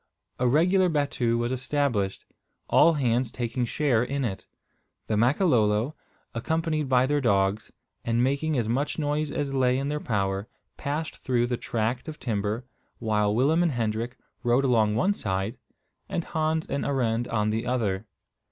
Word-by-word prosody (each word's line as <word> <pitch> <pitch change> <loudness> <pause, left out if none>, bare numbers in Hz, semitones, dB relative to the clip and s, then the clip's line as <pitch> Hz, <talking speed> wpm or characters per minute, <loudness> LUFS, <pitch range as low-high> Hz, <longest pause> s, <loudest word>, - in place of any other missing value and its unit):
A 125 - +2
regular 180 +7 +4
battue 140 -6 0
was 120 +1 -1
established, 130 -7 -1 0.4
all 165 - +5
hands 125 -4 +1
taking 120 +1 -2
share 125 -2 +1
in 140 +1 -2
it. 95 -4 -5 0.6
The 110 - -1
Makololo, 120 - +2 0.4
accompanied 155 +3 -1
by 130 -1 +4
their 145 +1 +1
dogs, 100 -2 +1 0.3
and 115 +1 +1
making 140 +3 0
as 115 -3 0
much 135 +6 -1
noise 150 0 0
as 140 -2 -2
lay 130 -1 +2
in 140 +1 -2
their 150 0 -1
power, 100 -4 -1 0.3
passed 155 +2 -3
through 120 -2 +1
the 120 0 -1
tract 115 +4 -2
of 155 -1 -6
timber, 110 +1 -2 0.3
while 105 -2 +1
Willem 145 +8 +3
and 170 -4 +2
Hendrik 115 +1 -2 0.2
rode 120 +3 +2
along 110 -4 +3
one 190 - +2
side, 95 - -3 0.5
and 170 - -1
Hans 160 -1 -1
and 140 - -2
Arend 120 -4 0
on 105 -1 0
the 115 +2 -2
other. 110 -5 -1
125 Hz, 155 wpm, -26 LUFS, 110-145 Hz, 0.6 s, all